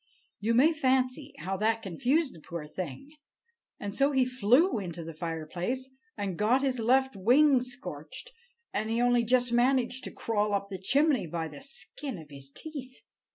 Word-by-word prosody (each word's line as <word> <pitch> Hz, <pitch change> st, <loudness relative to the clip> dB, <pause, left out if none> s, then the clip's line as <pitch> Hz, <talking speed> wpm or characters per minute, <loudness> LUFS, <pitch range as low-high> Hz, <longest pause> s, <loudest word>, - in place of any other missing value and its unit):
You 225 Hz, +3 st, +1 dB
may 300 Hz, +7 st, +6 dB
fancy 265 Hz, 0 st, +1 dB
how 195 Hz, -6 st, -3 dB
that 225 Hz, +2 st, +1 dB
confused 265 Hz, -, +1 dB
the 165 Hz, -, -13 dB
poor 165 Hz, 0 st, -6 dB
thing! 175 Hz, -, -6 dB, 0.7 s
And 200 Hz, -1 st, -4 dB
so 275 Hz, +1 st, +3 dB
he 260 Hz, -1 st, +4 dB
flew 255 Hz, -, +3 dB
into 175 Hz, -3 st, -5 dB
the 165 Hz, 0 st, -7 dB
fireplace, 175 Hz, +11 st, -4 dB, 0.3 s
and 195 Hz, -4 st, -3 dB
got 240 Hz, +6 st, +3 dB
his 260 Hz, -3 st, 0 dB
left 265 Hz, +2 st, +3 dB
wing 255 Hz, +7 st, +5 dB
scorched, 245 Hz, -, -7 dB, 0.4 s
and 215 Hz, +1 st, -1 dB
he 230 Hz, +1 st, 0 dB
only 245 Hz, 0 st, +4 dB
just 245 Hz, +1 st, +2 dB
managed 250 Hz, +1 st, +2 dB
to -, -, -5 dB
crawl 210 Hz, -2 st, 0 dB
up 200 Hz, 0 st, -2 dB
the 190 Hz, -2 st, -5 dB
chimney 275 Hz, -, +2 dB
by 160 Hz, 0 st, -3 dB
the 145 Hz, -, -10 dB
skin 275 Hz, -2 st, -6 dB
of 155 Hz, -3 st, -12 dB
his 135 Hz, -1 st, -9 dB
teeth. 265 Hz, -, -8 dB
240 Hz, 170 wpm, -29 LUFS, 185-265 Hz, 0.7 s, may